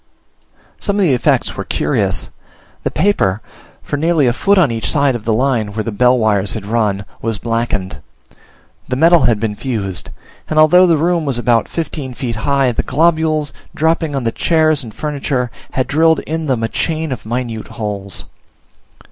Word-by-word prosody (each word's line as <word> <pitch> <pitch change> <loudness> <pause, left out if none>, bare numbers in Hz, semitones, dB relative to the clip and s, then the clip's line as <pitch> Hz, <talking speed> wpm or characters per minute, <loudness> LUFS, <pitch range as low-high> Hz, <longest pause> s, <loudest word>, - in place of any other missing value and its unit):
Some 200 - -1
of 205 - +2
the 160 -7 +3
effects 125 - +1
were - - -4
curious: - - -1 0.5
the - - -1
paper, 105 - +1 0.4
for 145 - -3
nearly 160 -1 +2
a 120 - +2
foot 200 +9 +2
on 170 -9 +4
each 115 -1 -2
side 140 -4 +2
of 115 - -6
the 115 - +1
line 115 -4 0
where 110 - -1
the 115 - -3
bell 125 +4 +3
wires 105 -4 +1
had 110 -3 -6
run, 105 -3 0 0.2
was 115 -2 -2
blackened. 115 -4 -2 0.9
The 125 - -2
metal 165 +3 +5
had 115 -3 +2
been 105 -1 -2
fused, 100 -7 -3 0.4
and 155 - -2
although 180 +4 +6
the 165 -2 +3
room 170 +2 +1
was 135 -5 -1
about 120 -1 +1
fifteen 150 -6 -4
feet 120 -4 -4
high, 135 +2 +1
the 115 - -1
globules, 155 -2 +1 0.2
dropping 160 -1 0
on 135 - -2
the 115 - 0
chairs 155 -1 +2
and 115 - -9
furniture, 135 -3 -2 0.2
had 130 - 0
drilled 160 +1 +3
in 160 0 -4
them 125 -4 0
a - - +1
chain 160 +5 -2
of 130 - -4
minute 115 -1 -4
holes. 100 -3 -6
130 Hz, 180 wpm, -16 LUFS, 115-155 Hz, 0.9 s, although